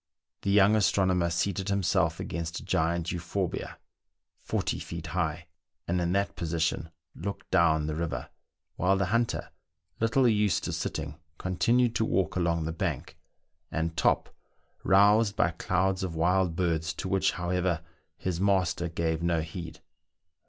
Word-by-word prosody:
The - - -2
young 100 +1 +5
astronomer 95 -4 +2
seated 95 +3 -1
himself 100 -4 +1
against 85 0 -4
a - - -12
giant 85 +1 0
euphorbia, 90 +1 -3 0.6
forty - - -2
feet - - -6
high, - - -1 0.4
and 90 +1 +1
in 85 0 0
that 100 0 0
position 80 -1 -1 0.2
looked 100 +4 -6
down 80 -3 +4
the 75 - -2
river, 85 +1 -3 0.5
while 95 +1 +3
the 95 - +1
hunter, 115 0 0 0.5
little 120 +3 +3
used 105 -5 +2
to - - -3
sitting, 75 0 -4 0.2
continued 115 +6 +2
to 110 - +1
walk 95 -3 0
along 85 -3 +1
the 80 - -2
bank, 80 - -3 0.6
and 80 0 -2
Top 75 - +1 0.5
roused 100 +2 +4
up 85 0 +1
clouds 95 +1 +1
of 90 -3 -3
wild 90 +1 +2
birds, 80 -2 0
to - - -4
which, 95 0 +2
however, 90 -2 -1 0.4
his 90 -1 -3
master 95 -3 +1
gave 80 -1 -1
no 85 -1 +1
heed. 80 +1 -7
90 Hz, 145 wpm, -28 LUFS, 85-100 Hz, 0.6 s, young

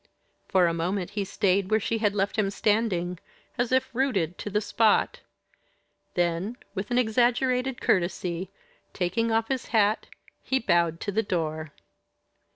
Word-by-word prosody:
For 185 -2 +4
a 170 - +1
moment 180 +3 -2
he 205 -1 -2
stayed 195 0 +1
where 220 - +3
she 225 +2 -1
had 210 -2 +1
left 200 0 0
him 210 -3 +1
standing, 195 -4 0 0.4
as 245 -1 -1
if 260 -1 +1
rooted 200 - 0
to - - -4
the 210 +1 +1
spot. 215 +1 +2 1.0
Then, 175 +6 0 0.2
with 200 0 -4
an 245 - +1
exaggerated 250 +2 +2
courtesy, 175 0 0 0.4
taking 200 +6 0
off 225 0 +1
his 265 -2 -2
hat, 215 -1 +2 0.3
he 265 - 0
bowed 170 -7 +1
to 205 - -2
the 215 +3 +1
door. 160 -6 -3
205 Hz, 150 wpm, -26 LUFS, 180-230 Hz, 1.0 s, For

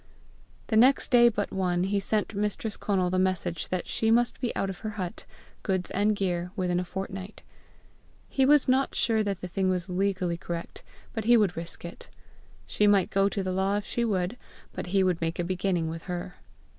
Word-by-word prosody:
The 220 - -1
next 255 +6 +5
day 240 -1 +7
but 210 -3 -3
one, 180 -2 0
he 200 +2 +1
sent 210 +2 -1
Mistress 210 +1 -2
Conal 185 -3 0
the 185 - +1
message 185 -3 0
that 185 -1 -2
she 220 - 0
must 240 +2 +2
be 245 - 0
out 195 - 0
of 190 -2 -6
her 215 - -4
hut, 180 -3 -5 0.4
goods 185 -2 -1
and 210 +2 +2
gear, 180 -3 -1
within 180 -3 0
a - - -1
fortnight. 190 +2 -6 0.8
He 270 - +1
was 290 +1 +5
not 260 +1 +2
sure 225 -2 +3
that 200 -3 -2
the 180 - -4
thing 185 +1 0
was 185 0 -2
legally 185 -2 0
correct, 170 0 -6 0.3
but 220 -2 -3
he 240 +1 +6
would 205 -5 +2
risk 170 +1 -6
it. 170 - -9 0.6
She 210 - +2
might 200 -3 +3
go 195 0 +3
to 200 -1 -2
law 190 +2 0
if 205 - -4
she 235 - -1
would, 200 0 -1 0.4
but - - -5
he 190 +1 +2
would 180 -3 +1
make 165 +1 -1
a 175 - 0
beginning 180 -1 -1
with 165 +1 -6
her! 180 0 -5
190 Hz, 200 wpm, -27 LUFS, 180-210 Hz, 0.8 s, day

